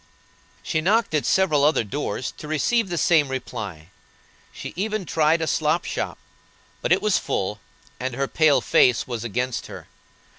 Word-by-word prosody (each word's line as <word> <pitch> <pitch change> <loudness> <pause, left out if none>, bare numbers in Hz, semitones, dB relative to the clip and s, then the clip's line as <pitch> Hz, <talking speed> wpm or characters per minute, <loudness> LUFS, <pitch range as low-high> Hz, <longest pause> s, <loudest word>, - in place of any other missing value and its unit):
She 155 - -1
knocked 210 +3 +2
at 150 - +1
several 165 -7 +3
other 150 -4 +3
doors, 120 +1 -4
to 150 - -8
receive 195 - +1
the 175 - -2
same 160 -3 +4
reply. 105 -11 -6 0.6
She - - -8
even 210 +1 -2
tried 160 +1 +2
a - - +1
slop 155 +2 +1
shop, - - -3 0.6
but - - -2
it - - +3
was 215 -2 +3
full, 100 +2 -2 0.4
and 130 -1 -3
her 135 +1 -1
pale 145 -4 +3
face 125 0 +3
was 120 -3 -5
against 125 +2 -2
her. - - -10
150 Hz, 160 wpm, -23 LUFS, 125-170 Hz, 0.6 s, same